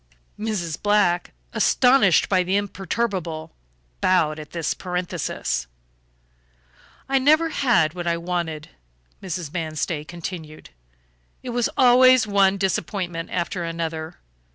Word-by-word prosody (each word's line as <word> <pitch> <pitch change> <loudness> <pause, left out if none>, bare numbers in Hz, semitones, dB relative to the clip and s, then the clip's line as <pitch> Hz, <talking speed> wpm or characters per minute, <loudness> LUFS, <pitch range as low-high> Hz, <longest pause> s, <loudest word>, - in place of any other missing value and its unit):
Mrs. 195 -8 -3
Black, 205 -4 +2 0.2
astonished 250 - +4
but 185 -2 +1
imperturbable, 190 -4 -2 0.5
bowed 155 -4 +2
at 150 -1 -9
this 165 -3 -2
parenthesis. 180 - -3 1.4
"I 270 0 +2
never 310 +5 +4
had 235 - +2
what 175 -1 -5
I 170 0 +1
wanted," 170 -3 -3 0.5
Mrs. 175 -4 -5
Manstey 155 -2 -3
continued. 165 - -8 0.7
"It 250 - -5
was 240 -1 0
always 255 -1 +6
one 200 -1 +3
disappointment 180 -3 -2
after 175 0 -2
another. 165 -1 -4
180 Hz, 105 wpm, -23 LUFS, 165-205 Hz, 1.4 s, always